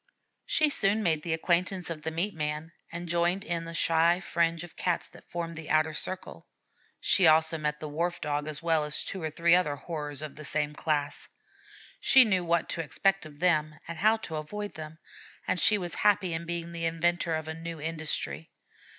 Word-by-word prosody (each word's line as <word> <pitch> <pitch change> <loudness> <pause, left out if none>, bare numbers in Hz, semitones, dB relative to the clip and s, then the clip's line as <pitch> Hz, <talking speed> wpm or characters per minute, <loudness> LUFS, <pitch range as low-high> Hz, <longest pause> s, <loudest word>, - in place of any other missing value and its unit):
She 310 -2 +3
soon 215 -2 +2
made 160 -4 +2
the 165 - -4
acquaintance 175 +2 0
of 155 -2 -5
the 160 - -2
meat 175 +6 -1
man, 150 +1 -3 0.2
and 170 +1 -5
joined 175 +3 +1
in 170 -1 -3
the 165 0 -7
shy 170 +2 +3
fringe 170 -2 0
of 175 - -11
Cats 180 -2 -1
that - - -17
formed 170 -1 -4
the 160 0 -8
outer 155 0 +2
circle. 185 +4 -5 0.5
She 185 -4 +4
also 160 +1 +4
met 150 0 -2
the 155 - -5
Wharf 170 +4 -2
Dog 145 0 -2
as 155 +1 -1
well 165 -2 +2
as 150 0 0
two 190 - -5
or 160 - -2
three 170 +2 +3
other 175 -5 +3
horrors 150 -1 -5
of 150 -1 -8
the 155 - -8
same 150 +1 -1
class. 150 -2 -2 0.7
She 265 -1 +7
knew 190 -5 +2
what 170 -1 +1
to 165 - -2
expect 195 +3 0
of 145 -1 -15
them 155 -2 +2
and 170 -1 -6
how 215 +3 +4
to 160 - -4
avoid 205 +7 -5
them; 155 0 -8 0.5
and 185 - +1
she 210 - +6
was 175 -3 -5
happy 195 -4 +2
in 165 +1 -4
being 170 0 -3
the 165 -1 -3
inventor 165 0 +1
of 160 0 -4
a 160 - -3
new 165 0 -7
industry. 150 - -3
165 Hz, 200 wpm, -29 LUFS, 155-175 Hz, 0.7 s, She